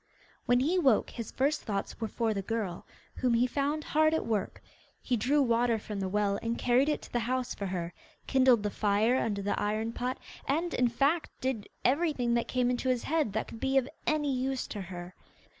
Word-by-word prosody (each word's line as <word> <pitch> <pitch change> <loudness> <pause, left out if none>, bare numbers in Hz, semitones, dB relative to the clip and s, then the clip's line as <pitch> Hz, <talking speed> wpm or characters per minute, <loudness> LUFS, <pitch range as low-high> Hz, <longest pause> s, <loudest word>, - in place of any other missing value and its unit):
When 245 0 +4
he 340 +7 +2
woke 265 -10 +3
his 230 -3 -6
first 285 +4 +1
thoughts 200 +2 -4
were 225 - 0
for 225 0 -1
the 200 - -2
girl, 200 -4 -3 0.3
whom 245 -2 +2
he 235 +2 +4
found 285 +4 -1
hard 310 +1 +3
at - - -1
work. 215 -4 -2 0.4
He 250 - 0
drew 270 +6 +2
water 235 -1 +2
from 210 -1 -6
the 190 -1 -2
well 200 0 +1
and 230 0 -2
carried 250 +4 +3
it 300 - -1
to - - -13
the 240 - +2
house 250 +2 -1
for 200 - -4
her, 175 -2 -3 0.3
kindled 255 -5 +4
the 210 - -1
fire 215 +5 +2
under 200 -3 -1
the 200 - -1
iron 215 +2 -1
pot, 250 +2 -2 0.3
and, 330 +5 0
in 250 - +3
fact, 280 +7 +1
did 250 -6 -2 0.2
everything 270 -4 +2
that 235 0 +1
came 250 -1 +1
into 250 +1 -1
his 250 -2 +1
head 305 -9 0
that 220 - -1
could 225 - -9
be 270 +2 +1
of 260 -1 +3 0.2
any 295 -2 +1
use 260 +1 -1
to 205 - -5
her. 175 -1 -8
245 Hz, 210 wpm, -30 LUFS, 210-270 Hz, 0.4 s, When